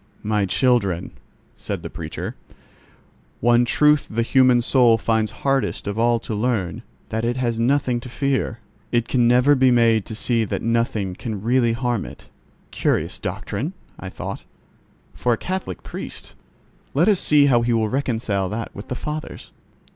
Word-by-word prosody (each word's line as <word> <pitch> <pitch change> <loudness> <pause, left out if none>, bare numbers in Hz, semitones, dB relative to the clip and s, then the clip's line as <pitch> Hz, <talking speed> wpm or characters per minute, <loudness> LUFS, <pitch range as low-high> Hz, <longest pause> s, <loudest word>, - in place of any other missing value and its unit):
"My 105 -2 0
children," 100 -7 +1 0.5
said - - -5
the - - -5
preacher, - - -6 1.0
"one 120 0 +4
truth 150 +4 +3
the 115 +2 0
human 130 0 +4
soul 120 -1 +4
finds 110 -1 0
hardest 135 +4 -1
of 100 +2 -3
all 120 0 +3
to 115 - -5
learn: 105 -5 -1 0.3
that 110 +1 -2
it 120 +2 0
has 120 -3 -1
nothing 125 0 +1
to 125 - -9
fear. 135 -2 -1 0.3
It 120 -1 +1
can 120 -2 +2
never 125 +4 +5
be 130 -2 +4
made 115 -3 +3
to 110 - -6
see 115 +1 +1
that 105 - -3
nothing 115 -4 0
can 105 0 -6
really 120 0 +2
harm 120 -2 -1
it." - - -12 0.4
"Curious - - -1
doctrine!" 135 - -4 0.3
I 95 - -6
thought, - - -6 0.7
"for 125 - 0
a - - -1
Catholic 185 - -4
priest. - - -8 0.6
Let 160 +6 +3
us 205 -4 +4
see 150 -1 +4
how 125 -4 +4
he 120 +1 0
will 110 -2 +2
reconcile 110 -7 -1
that 115 +1 -5
with 100 - -9
the 125 - -4
Fathers." 150 +3 -6
120 Hz, 160 wpm, -22 LUFS, 110-130 Hz, 1.0 s, never